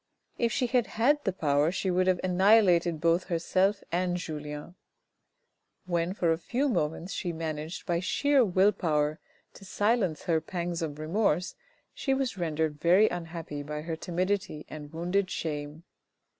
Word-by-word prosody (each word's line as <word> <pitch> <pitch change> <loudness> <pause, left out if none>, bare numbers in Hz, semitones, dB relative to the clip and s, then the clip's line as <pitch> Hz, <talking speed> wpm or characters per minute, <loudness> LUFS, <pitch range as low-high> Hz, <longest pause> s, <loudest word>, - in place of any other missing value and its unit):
If 235 -1 +2
she 255 - +1
had 245 -1 +1
had 290 +6 +3
the 195 - +2
power 150 -3 +1
she 190 0 -1
would 185 +1 +2
have 185 -1 +3
annihilated 185 -3 +4
both 170 +2 +2
herself 185 +4 +1
and 180 +1 0
Julien. 150 -1 -6 1.1
When 175 +1 -1
for 170 -5 +2
a 165 - 0
few 250 - -1
moments 165 -3 -1
she 175 - -2
managed 160 0 -5
by 170 -1 0
sheer 275 +9 +3
will 190 0 +4
power 155 -4 0 0.3
to - - -14
silence 205 -5 0
her 165 -2 +1
pangs 175 -2 -3
of 150 -3 -3
remorse, 175 +2 0 0.4
she 270 -2 0
was 265 -5 -1
rendered 160 -4 -2
very 185 +6 +5
unhappy 165 -4 -5
by 150 +1 -5
her 165 0 -3
timidity 180 -1 -2
and 150 -1 -9
wounded 180 +4 -1
shame. 150 -1 -4
175 Hz, 155 wpm, -28 LUFS, 160-195 Hz, 1.1 s, very